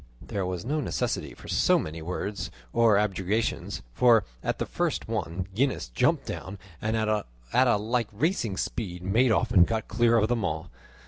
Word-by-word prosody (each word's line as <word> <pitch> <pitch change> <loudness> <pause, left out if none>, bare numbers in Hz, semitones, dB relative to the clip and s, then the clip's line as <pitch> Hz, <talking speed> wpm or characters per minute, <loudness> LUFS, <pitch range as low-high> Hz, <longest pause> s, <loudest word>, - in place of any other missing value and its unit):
There 95 -2 -3
was 90 +2 -4
no 150 +5 0
necessity - - -2
for - - -13
so - - +3
many 80 +1 -4
words 90 +4 -4 0.2
or 115 -3 +5
objurgations, 100 +1 -1
for 120 - +5 0.2
at - - -1
the - - -2
first - - -2
one 95 -5 -2
Gines 130 - 0
jumped - - +1
down, 95 +2 -6 0.2
and 110 +1 0
at 110 -1 0 0.6
a 120 - +4
like 115 +2 0
racing 115 - 0
speed 90 -5 -3
made 115 +6 +3
off 120 +2 +1
and 90 -5 +6
got 110 -1 -2
clear 115 0 +3
of 110 -1 +3
them 120 -2 0
all. 80 +3 -3
105 Hz, 175 wpm, -27 LUFS, 95-115 Hz, 0.6 s, and